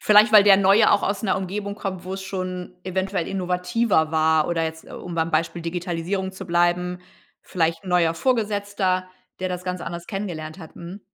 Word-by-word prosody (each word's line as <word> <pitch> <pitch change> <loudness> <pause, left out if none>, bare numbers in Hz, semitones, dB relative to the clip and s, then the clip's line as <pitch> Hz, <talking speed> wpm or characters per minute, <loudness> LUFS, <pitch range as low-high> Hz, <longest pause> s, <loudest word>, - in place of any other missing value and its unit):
Vielleicht 210 +1 +6
weil 210 -2 +9
der 195 -2 +8
Neue 200 +3 +5
auch 205 - +3
aus 200 +2 -1
'ner 195 - +1
Umgebung 200 +2 -4
kommt, 195 -3 -5
wo 185 +1 -4
es 190 - -6
schon 185 -2 -5
eventuell 190 -1 -2
innovativer 180 -1 0
war 160 -1 +2
oder 165 -1 0
jetzt, 160 0 -6
äh, - - -14
um 175 - -7
beim 165 0 0
Beispiel 165 +1 -1
Digitalisierung 175 +2 -3
zu 190 0 -9
bleiben, 175 +1 +1 0.4
vielleicht 165 0 -1
'n - - -8
neuer 170 -2 +3
Vorgesetzter, 205 -4 0 0.3
der 185 - -1
das 180 0 -5
ganz 180 -1 -3
anders 170 0 -6
kennengelernt 175 -5 -5
hat, 160 -4 -12
mhm. 175 +4 -9
185 Hz, 190 wpm, -23 LUFS, 170-195 Hz, 0.4 s, weil